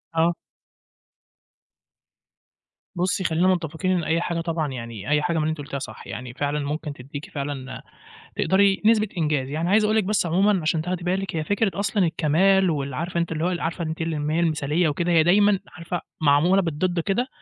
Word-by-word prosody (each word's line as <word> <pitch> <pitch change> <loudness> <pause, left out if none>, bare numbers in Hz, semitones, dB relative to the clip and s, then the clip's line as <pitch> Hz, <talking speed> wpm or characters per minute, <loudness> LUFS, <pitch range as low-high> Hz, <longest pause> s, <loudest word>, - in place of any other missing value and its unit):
آه. 165 +1 +3 2.6
بُصّي 185 +2 0
خلّينا 170 +2 +2
متّفقين 175 0 0
إن 180 -2 +1
أي 165 +2 +1
حاجة 170 -1 -2
طبعًا 165 -2 -1
يعني، 115 -3 -7
أي 150 0 +3
حاجة 165 +1 0
من 155 - +1
اللي 155 - 0
أنتِ 160 - -4
قُلتيها 140 -1 -5
صح، 110 -4 -9
يعني 125 +1 -7
فعلًا 145 +3 -1
ممكن 150 +1 -3
تديكِ 140 +2 -9
فعلًا 140 -2 -5 0.5
تقدري 195 0 +3
نسبة 220 -1 +4
إنجاز، 150 -5 0
يعني 160 +4 -2
عايز 215 +3 +4
أقول 215 +1 +2
لِك 220 - +3
بس 205 0 +1
عمومًا 190 +3 +2
عشان 155 +1 0
تاخدي 180 +1 -3
بالِك، 185 0 -1
هي 155 - -1
فكرة 205 +3 0
أصلًا 200 -1 +1
الكمال 175 +4 +3
وال 140 -4 -2
عارفة 170 +5 -2
أنتِ 170 -1 -1
اللي 160 0 -2
هو 180 +1 +1
عارفة 170 +1 -3
أنتِ 160 +1 -4
اللي 160 0 -1 0.2
هي 165 - +1
المثاليّة 160 0 +1
وكده، 170 +4 -1
هي 160 -2 +5
دايمًا 200 +3 +4 0.2
عارفة 175 0 -4 0.2
معمولة 160 +6 +4
بالضد 175 +2 -1
كده، 200 +9 0
165 Hz, 185 wpm, -24 LUFS, 150-185 Hz, 2.6 s, هي